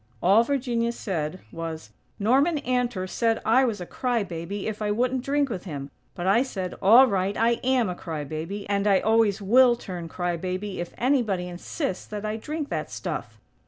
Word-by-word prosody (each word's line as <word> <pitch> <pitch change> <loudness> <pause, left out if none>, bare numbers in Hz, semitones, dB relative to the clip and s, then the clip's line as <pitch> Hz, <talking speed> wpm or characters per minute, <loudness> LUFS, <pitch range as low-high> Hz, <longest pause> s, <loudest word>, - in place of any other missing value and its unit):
All 200 - +5
Virginia 240 -3 0
said 180 -6 -4
was: 160 -8 -6 0.3
"Norman 270 +10 +3
Antor 245 -7 -1
said 225 +3 +1
I 255 +4 +5
was 220 -5 -2
a 180 - -5
cry 245 +2 -1
baby 180 +2 -5
if 215 -1 -4
I 210 - 0
wouldn't 250 +4 0
drink 285 +1 +1
with 195 -7 -5
him. 140 -5 -6 0.2
But 175 -1 -4
I 195 +5 +4
said, 190 -9 -3
'All 230 +7 +8
right; 200 -3 0
I 235 +1 +2
am 255 -3 +2
a 180 - -2
cry 160 -4 -5
baby! 165 +8 -5
And 200 0 +1
I 195 -2 +5
always 220 -2 +2
will 245 +4 +6
turn 180 -7 -7
'cry 175 +1 -2
baby' 185 +3 -4
if 175 - -4
anybody 230 -9 +1
insists 180 - -4
that 210 0 -5
I 215 +1 -2
drink 300 +5 -4
that - - -3
stuff.'" - - -5
205 Hz, 190 wpm, -25 LUFS, 180-245 Hz, 0.3 s, All